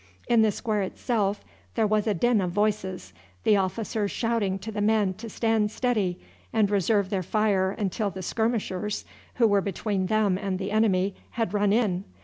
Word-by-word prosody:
In 235 -2 +4
the 220 -1 +4
square 215 0 -1
itself 205 +1 -1 0.3
there 225 - +2
was 215 +1 +1
a 210 - +2
din 240 +3 +3
of 180 - -1
voices, 195 -1 -1 0.3
the 210 - +5
officers 205 +2 -1
shouting 225 -5 0
to 210 +3 -7
the 210 -1 -3
men 210 -2 +2
to 230 0 -7
stand 225 -1 +1
steady 210 -6 0 0.3
and 210 -2 +2
reserve 200 0 +2
their 195 -2 0
fire 195 0 +1
until 200 +1 -2
the 190 -1 -7
skirmishers, 210 -2 -1 0.3
who 235 -2 +4
were 205 -2 +3
between 195 0 -2
them 205 -3 +2
and 195 -2 -2
the 195 +1 -4
enemy, 200 -3 +2 0.2
had 225 -2 -1
run 205 -1 +2
in. 205 -5 +1
205 Hz, 175 wpm, -26 LUFS, 190-220 Hz, 0.3 s, the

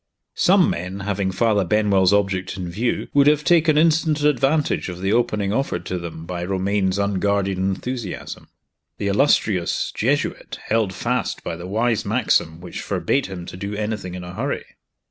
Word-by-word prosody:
Some - - +5
men, 90 +3 -5
having 100 -1 -1
Father 105 +1 +2
Benwell's 100 -1 +3
object 95 -2 0
in 90 -2 -4
view, 115 +7 -1
would 140 0 +5
have 150 0 +4
taken 160 -3 +4
instant 155 -1 +3
advantage 145 -3 +1
of 90 -1 -7
the 95 +2 0
opening 105 -4 +1
offered 135 +4 -1
to 90 - -3
them 80 -1 -7
by 85 0 -4
Romayne's 95 +1 0
unguarded 100 -1 0
enthusiasm. 95 +3 -4 0.5
The 100 - -1
illustrious 100 -6 +2
Jesuit - - -1
held 110 -3 +1
fast 120 +7 -2
by - - -4
the 85 +2 -8
wise 110 +2 0
maxim 80 0 +1
which 90 -1 -7
forbade 135 -1 0
him 90 -3 -7
to - - -9
do 100 +3 -5
anything 105 -4 -3
in 90 - -6
a 90 0 -8
hurry. - - -3
100 Hz, 165 wpm, -22 LUFS, 95-120 Hz, 0.5 s, Some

